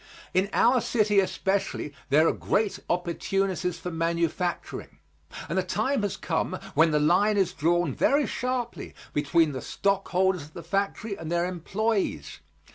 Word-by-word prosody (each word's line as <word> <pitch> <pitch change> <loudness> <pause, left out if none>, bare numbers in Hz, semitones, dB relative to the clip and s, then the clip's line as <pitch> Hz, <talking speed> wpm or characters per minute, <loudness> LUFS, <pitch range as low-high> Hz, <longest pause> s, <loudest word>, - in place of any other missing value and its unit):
In 190 +2 +2
our 245 +1 +4
city 210 -4 +2
especially 190 -5 -1 0.2
there 155 +4 +5
are - - +3
great 210 -1 0
opportunities 180 +1 -1
for 180 - -5
manufacturing, 170 - -2 0.5
and 165 - -3
the - - +3
time 215 +8 0
has 205 -2 -2
come 180 +2 -1 0.2
when 160 +3 +5
the 150 -1 +2
line 190 +8 +3
is 190 -3 +2
drawn 170 0 +1
very 285 - +3
sharply 250 -1 -3 0.2
between 150 +2 +2
the 130 -2 -5
stockholders 190 0 0
of 150 +2 -12
the 170 - -8
factory 200 +4 -2
and 165 -3 -7
their 170 0 +2
employés. 195 +4 -2
180 Hz, 145 wpm, -27 LUFS, 165-200 Hz, 0.5 s, there